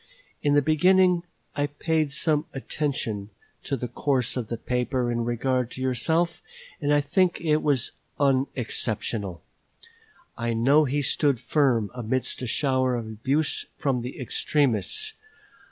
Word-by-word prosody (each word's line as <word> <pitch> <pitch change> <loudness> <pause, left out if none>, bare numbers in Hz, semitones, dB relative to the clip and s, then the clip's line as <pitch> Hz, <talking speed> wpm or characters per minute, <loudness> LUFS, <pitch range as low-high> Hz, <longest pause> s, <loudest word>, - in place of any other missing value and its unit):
In 145 0 +2
the 145 - +4
beginning 180 +4 +4 0.3
I 145 0 +1
paid 155 +1 0
some 150 +2 +1
attention 130 -8 -2 0.3
to 135 - -2
the 125 - -3
course 130 -2 0
of 125 -4 -3
the 115 - -3
paper 125 +1 -1
in 120 0 -1
regard 125 +1 0
to 130 - -7
yourself, 160 +7 +1 0.4
and 145 0 +1
I 145 0 +4
think 175 +5 +2
it 155 -2 +2
was 140 -5 +1 0.3
unexceptionable: 115 - 0 0.9
I 115 -1 -1
know 140 +7 +4
he 145 +2 0
stood 140 -1 +2
firm 125 -9 +1
amidst 125 +2 -2
a 125 - -3
shower 130 -1 +1
of 115 -2 -3
abuse 130 +8 -1
from 130 -4 0
the 125 +2 -7
extremists. 140 - 0
135 Hz, 135 wpm, -26 LUFS, 120-150 Hz, 0.9 s, the